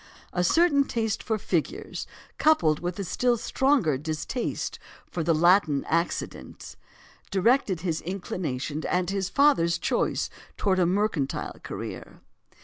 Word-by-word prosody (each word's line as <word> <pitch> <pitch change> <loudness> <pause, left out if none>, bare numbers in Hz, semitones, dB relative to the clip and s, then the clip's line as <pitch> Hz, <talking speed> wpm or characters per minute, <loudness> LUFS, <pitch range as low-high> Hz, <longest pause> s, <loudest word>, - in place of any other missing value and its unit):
A 180 - +1
certain 285 - +4
taste 225 -4 -1
for 220 - -1
figures, 215 - -3 0.3
coupled 165 - +4
with 175 0 -4
a 200 - -2
still 240 +6 +1
stronger 235 - +1
distaste 155 - -3 0.3
for 175 - -4
the 165 0 +2
Latin 170 -3 +4
accidence, 170 +2 -3 0.5
directed 195 -2 +2
his 165 -3 -1
inclination 155 -5 -4
and 180 0 0
his 195 -1 -1
father's 195 - +3
choice - - 0 0.3
towards 190 -2 +2
a 175 - +4
mercantile 185 -7 -1
career. - - -7
185 Hz, 125 wpm, -26 LUFS, 165-225 Hz, 0.5 s, certain